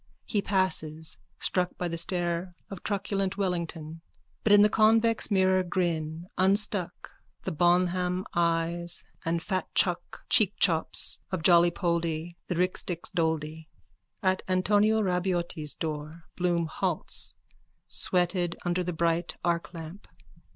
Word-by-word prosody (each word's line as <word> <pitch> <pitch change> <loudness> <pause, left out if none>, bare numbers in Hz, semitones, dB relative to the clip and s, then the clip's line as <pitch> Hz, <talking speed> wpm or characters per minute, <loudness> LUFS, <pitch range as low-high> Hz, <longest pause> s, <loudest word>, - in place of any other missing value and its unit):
He 205 - 0
passes, 160 -6 -1 0.2
struck 180 -1 0
by 180 - -2
the 170 - -3
stare 175 +1 -2 0.2
of 195 - -7
truculent 195 -1 -2
Wellington, 165 -4 -3 0.4
but 215 - +2
in 205 0 +8
the - - +7
convex 225 +1 +3
mirror 190 -2 +3
grin 170 -3 -2
unstruck 190 -1 +2 0.3
the - - -3
bonham 180 +2 +1
eyes 170 0 0 0.2
and 165 0 0
fatchuck 180 -2 -1
cheekchops 190 -5 +3
of 185 -4 -3
Jollypoldy 170 -1 +2
the 180 - -2
rixdix 180 -1 -1
doldy._ 160 -2 -2 0.6
_At 185 0 +2
Antonio 205 +4 +3
Rabaiotti's 175 -4 -1
door 155 +1 -5
Bloom 175 -2 0
halts, 155 - -1 0.5
sweated 175 -1 0
under 175 +1 0
the 180 0 -3
bright 165 0 0
arclamp. 170 +1 -4
175 Hz, 110 wpm, -28 LUFS, 165-185 Hz, 0.6 s, in